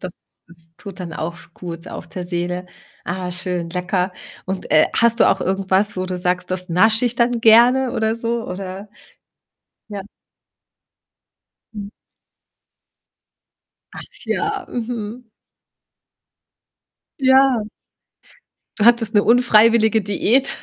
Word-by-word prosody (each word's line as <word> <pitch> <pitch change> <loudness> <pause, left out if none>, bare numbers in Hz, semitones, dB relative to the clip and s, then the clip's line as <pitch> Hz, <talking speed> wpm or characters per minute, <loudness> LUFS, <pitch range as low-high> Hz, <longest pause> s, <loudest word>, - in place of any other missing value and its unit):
das 180 -2 -7 0.4
ist 165 -1 -15
tut 195 -3 -10
dann 175 -2 -6
auch 165 +2 -4
s 175 -1 -16
gut 170 -1 -8
auch - - -8
der 180 -1 -7
Seele. 180 +1 -4 0.4
Ah, 180 +1 -4
schön, 180 -2 -4
lecker, 180 +1 -2 0.3
und, 190 0 -5
äh, 155 0 +5
hast 230 0 +2
du - - +6
auch - - +1
irgendwas, 195 +1 +1
wo 185 0 -3
du 185 -1 -4
sagst: 180 0 0
„Das 185 0 -2
nasche 220 +7 +3
ich 245 -1 0
dann 240 0 +1
gerne“, 240 +3 +5
oder 220 0 0
so? 230 0 -3
Oder 190 +2 -7 1.0
ja? 200 -2 -6 1.7
Mhm. 205 -1 -7 2.0
Ach - - -8 0.2
ja, 415 -2 -2
mhm. 235 0 -6 1.9
Ja. 265 -2 +4 1.2
Du 210 - +1
hattest 235 -2 +3
'ne 205 - +5
unfreiwillige 225 -2 +4
Diät 220 +6 +1
205 Hz, 120 wpm, -19 LUFS, 180-230 Hz, 2.0 s, du